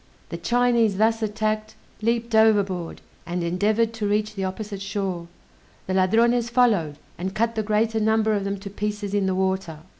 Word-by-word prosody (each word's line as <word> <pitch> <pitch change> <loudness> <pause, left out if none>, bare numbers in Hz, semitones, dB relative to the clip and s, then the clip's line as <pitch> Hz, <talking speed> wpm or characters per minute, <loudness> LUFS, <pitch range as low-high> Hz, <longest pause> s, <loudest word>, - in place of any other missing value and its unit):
The 170 - -5
Chinese 235 +2 +2
thus 225 +2 +2
attacked, 215 0 -2 0.3
leaped 230 +1 0
overboard, 205 -6 +2 0.3
and 175 0 -2
endeavored 210 +6 +1
to 220 -2 -2
reach 210 +1 0
the 195 -2 -4
opposite 200 +1 -5
shore; 195 -3 -3 0.6
the 185 - -2
Ladrones 230 +5 +3
followed, 215 - +2 0.2
and 190 +2 -4
cut 230 +1 +1
the 220 - -1
greater 220 +1 +1
number 220 0 +2
of 200 -2 0
them 200 0 -2
to 200 - -7
pieces 205 0 -3
in 200 -2 +1
the 190 - 0
water. 190 -4 -1
210 Hz, 170 wpm, -24 LUFS, 190-225 Hz, 0.6 s, Ladrones